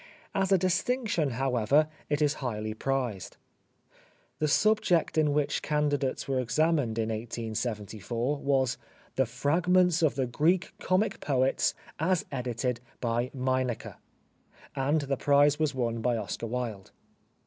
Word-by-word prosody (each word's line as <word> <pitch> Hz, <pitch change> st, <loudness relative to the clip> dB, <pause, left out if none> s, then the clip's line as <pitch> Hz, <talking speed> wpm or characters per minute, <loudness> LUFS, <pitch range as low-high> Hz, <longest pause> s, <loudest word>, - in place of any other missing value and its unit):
As 195 Hz, 0 st, 0 dB
a 195 Hz, -, +6 dB
distinction, 185 Hz, -, 0 dB
however, 130 Hz, +3 st, +2 dB, 0.2 s
it 150 Hz, 0 st, +1 dB
is 145 Hz, 0 st, +3 dB
highly 110 Hz, -4 st, -3 dB
prized. 125 Hz, -5 st, -3 dB, 1.0 s
The 155 Hz, -, +1 dB
subject 205 Hz, 0 st, +2 dB
in 155 Hz, -2 st, +3 dB
which 145 Hz, 0 st, 0 dB
candidates 145 Hz, -3 st, 0 dB
were 135 Hz, -1 st, 0 dB
examined 145 Hz, -2 st, +1 dB
in 115 Hz, -1 st, 0 dB
1874 115 Hz, +2 st, -3 dB
was 135 Hz, -2 st, +1 dB, 0.2 s
" -, -, -30 dB
The 130 Hz, -2 st, +2 dB
Fragments 175 Hz, +7 st, +2 dB
of 155 Hz, -3 st, +3 dB
the 135 Hz, -1 st, 0 dB
Greek 160 Hz, +9 st, +1 dB
Comic 195 Hz, +3 st, +1 dB
Poets, 135 Hz, -2 st, +1 dB, 0.2 s
as 170 Hz, +2 st, +1 dB
edited 125 Hz, -2 st, -2 dB, 0.2 s
by 120 Hz, +1 st, -1 dB
Meineke," 130 Hz, -3 st, -1 dB, 0.8 s
and 145 Hz, +4 st, +1 dB
the 140 Hz, -1 st, -2 dB
prize 145 Hz, +2 st, +4 dB
was 155 Hz, -3 st, 0 dB
won 115 Hz, -3 st, -1 dB
by 120 Hz, 0 st, +1 dB
Oscar 110 Hz, +2 st, -4 dB
Wilde. 115 Hz, -5 st, -4 dB
135 Hz, 130 wpm, -29 LUFS, 120-155 Hz, 1.0 s, a